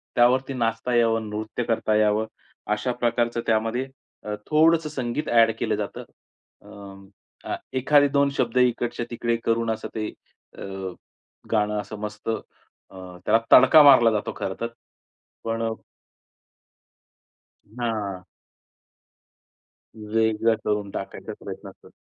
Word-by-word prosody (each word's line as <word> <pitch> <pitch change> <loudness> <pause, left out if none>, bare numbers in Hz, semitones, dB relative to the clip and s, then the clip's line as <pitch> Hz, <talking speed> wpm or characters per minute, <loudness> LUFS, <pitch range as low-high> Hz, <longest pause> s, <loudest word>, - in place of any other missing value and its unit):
त्यावरती 130 +3 +3
नाचता 115 0 -1
यावं, 115 -2 +2
नृत्य 110 +3 -4
करता 115 -2 0
यावं, 105 +1 +2 0.5
अशा 105 +4 -1
प्रकारचं 120 -1 0
त्यामध्ये 115 +4 0 0.4
अ, 105 - -4
थोडंसं 160 +1 +3
संगीत 130 0 -3
ॲड 115 -1 +5
केलं - - 0
जातं. - - -5 0.6
अ, 100 -1 -14
अ, - - 0 0.2
एखादे 145 +2 +4
2 140 0 +2
शब्द 120 0 0
इकडच्या-तिकडे 120 -1 0
करून, 115 0 +1
असं 110 - -4
ते 110 -1 -2 0.5
अ, - - -10 0.9
गाणं 105 -1 +1
असं 110 - -9
मस्त 105 +1 -6
अ, 110 - 0 0.9
त्याला 110 +2 +4
तडका 155 -2 +8
मारला 130 -5 +7
जातो, 105 -1 -2
खरंतर. 100 +5 -3 0.8
पण 115 0 -2
अ 115 - 0 2.1
हां. 105 -6 -3 1.9
वेगळा 110 0 +2
करून 105 -1 -1
टाकायचा 95 - -6
प्रयत्न - - -8
कर - - -16
115 Hz, 115 wpm, -24 LUFS, 110-120 Hz, 2.1 s, तडका